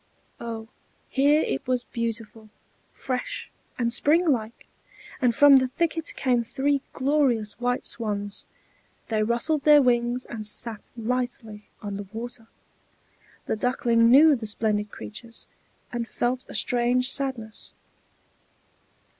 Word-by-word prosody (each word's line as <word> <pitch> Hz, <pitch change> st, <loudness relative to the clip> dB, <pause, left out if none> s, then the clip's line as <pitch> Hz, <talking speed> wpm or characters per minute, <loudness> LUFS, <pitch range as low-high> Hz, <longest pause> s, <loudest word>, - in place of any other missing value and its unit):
Oh, 225 Hz, -1 st, -6 dB, 0.4 s
here 290 Hz, +3 st, +3 dB
it 135 Hz, -, -3 dB
was 250 Hz, -1 st, +1 dB
beautiful, 230 Hz, -2 st, -5 dB, 0.4 s
fresh, 275 Hz, -, -4 dB, 0.3 s
and 235 Hz, -1 st, 0 dB
springlike! 280 Hz, -7 st, +1 dB, 0.6 s
and 245 Hz, -3 st, +3 dB
from 285 Hz, 0 st, +8 dB
the 260 Hz, 0 st, +2 dB
thicket 325 Hz, +4 st, -2 dB
came 245 Hz, -3 st, +1 dB
three 275 Hz, +4 st, 0 dB
glorious 260 Hz, -6 st, +1 dB
white 245 Hz, +1 st, 0 dB
swans; 205 Hz, -3 st, -3 dB, 0.6 s
they 220 Hz, -2 st, +1 dB
rustled 235 Hz, +8 st, 0 dB
their 295 Hz, +1 st, +7 dB
wings, 240 Hz, 0 st, +1 dB
and 215 Hz, -3 st, -6 dB
sat 220 Hz, 0 st, -3 dB
lightly 230 Hz, -2 st, -4 dB
on 200 Hz, -1 st, -4 dB
the 200 Hz, -1 st, -7 dB
water. 225 Hz, 0 st, -7 dB, 1.0 s
The -, -, -1 dB
Duckling 230 Hz, 0 st, +2 dB
knew 295 Hz, +4 st, +7 dB
the 225 Hz, -3 st, -6 dB
splendid 210 Hz, 0 st, -1 dB
creatures, 215 Hz, -, -10 dB, 0.5 s
and 235 Hz, -1 st, -3 dB
felt 245 Hz, +3 st, -2 dB
a -, -, -8 dB
strange 250 Hz, +2 st, +2 dB
sadness. 245 Hz, -6 st, -4 dB
240 Hz, 120 wpm, -25 LUFS, 225-265 Hz, 1.0 s, from